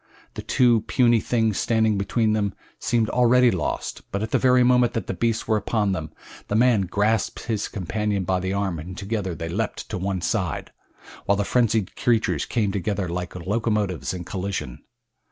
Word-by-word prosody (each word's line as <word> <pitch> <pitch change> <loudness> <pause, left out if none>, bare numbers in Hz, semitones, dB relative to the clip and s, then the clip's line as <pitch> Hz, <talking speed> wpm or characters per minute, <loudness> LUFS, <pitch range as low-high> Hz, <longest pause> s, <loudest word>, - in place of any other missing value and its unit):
The - - -6
two 120 -3 +3
puny 120 -3 +4
things 110 -3 0
standing 110 -2 +2
between 110 +3 +1
them 100 -2 -1 0.2
seemed 115 -1 +1
already 125 0 +5
lost, 85 -7 -3
but 100 +2 -2
at 110 - -4
the - - +3
very 125 -1 +4
moment 125 -1 +4
that 115 - -2
the - - -3
beasts 115 -1 -1
were 110 -1 +3
upon 105 -1 0
them 80 -5 -4 0.4
the 105 - -1
man 115 -5 +3
grasped 105 +4 0
his 110 -3 -2
companion 105 +1 -2
by 95 +1 0
the 95 +1 -2
arm 95 -4 -1
and 90 +4 -8
together 100 -4 -3
they 85 0 -5
leaped 105 +6 -3
to - - -3
one 95 -1 -2
side, - - -2 0.5
while 100 - +3
the 100 0 -1
frenzied 110 -5 +1
creatures 120 -3 +1
came 105 -5 0
together 100 -1 -2
like 90 +1 -4
locomotives 105 0 -1
in 90 -1 -5
collision. 95 +2 -4
105 Hz, 180 wpm, -24 LUFS, 95-115 Hz, 0.5 s, already